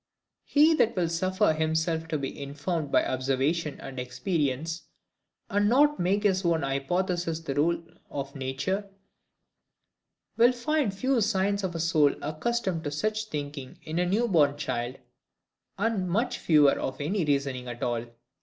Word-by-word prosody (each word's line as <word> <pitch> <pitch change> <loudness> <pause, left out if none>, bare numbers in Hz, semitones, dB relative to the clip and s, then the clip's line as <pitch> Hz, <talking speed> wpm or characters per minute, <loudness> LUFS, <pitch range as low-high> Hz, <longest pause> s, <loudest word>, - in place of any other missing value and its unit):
He 305 +3 +5
that 235 -4 +3
will 175 -3 +1
suffer 185 +2 +2
himself 160 +1 0
to 155 - -1
be 140 0 -5
informed 145 +2 -3
by - - +4
observation 135 +5 0
and 135 -1 -7
experience, 145 +4 -2 0.6
and 205 +1 +2
not 295 +4 +4
make 195 +4 +1
his 190 -2 +2
own 165 -3 +1
hypothesis 165 +5 -1
the 150 -4 -3
rule 165 +4 +2 0.3
of 140 0 -5
nature, 140 +10 -2 1.5
will 240 +2 +6
find 270 -1 0
few 255 +5 +1
signs 200 -1 +1
of 180 -2 -2
a - - -2
soul 155 -3 +3
accustomed 175 +3 -2
to 145 +5 -2
much 215 0 -4
thinking 145 -6 -6
in 160 +2 -3
a 180 - +1
new 225 +5 +2
born 145 -8 +3
child, 120 -3 -3 0.8
and 200 -3 0
much 240 +7 0
fewer 150 -4 +5
of 130 0 -4
any 175 +6 0
reasoning 140 -4 -1
at 120 0 -6
all. 120 -1 -1
165 Hz, 150 wpm, -27 LUFS, 140-200 Hz, 1.5 s, will